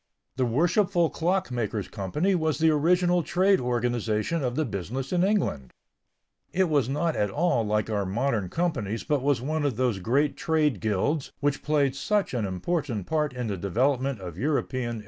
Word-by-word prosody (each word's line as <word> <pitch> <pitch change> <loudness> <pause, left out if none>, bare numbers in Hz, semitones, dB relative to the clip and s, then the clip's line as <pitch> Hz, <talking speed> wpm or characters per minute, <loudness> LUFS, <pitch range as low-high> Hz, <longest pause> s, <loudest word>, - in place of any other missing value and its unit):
The 130 -1 +1
Worshipful 175 - +2
Clock 180 -2 0
makers' 110 -5 -2
Company 150 - -1
was 160 -3 0
the 160 0 +4
original 175 +3 +3
trade 190 +4 +2
organization 120 +3 -1
of 125 -1 -1
the 155 - +1
business 120 - -4
in 180 0 +3
England. 185 - 0 0.8
It 185 -1 +1
was 140 -5 +2
not 150 +4 0
at 105 - +1
all 150 - +1
like 105 0 0
our 105 -2 -1
modern 105 0 -1
companies 130 - -2
but 145 -3 0
was 140 -3 +1
one 155 +2 -1
of 140 -5 0
those 120 -4 0
great 140 +9 +1
trade 155 -4 +1
"guilds" 110 +8 -1
which 145 0 0
played 145 -3 +1
such 205 +7 0
an 115 -5 -1
important 115 - -2
part 150 -2 0
in 125 -1 -3
the 100 -3 -2
development 130 +7 0
of 90 -1 -7
European 130 -2 -1
industry. 115 - -5
135 Hz, 175 wpm, -26 LUFS, 110-160 Hz, 0.8 s, the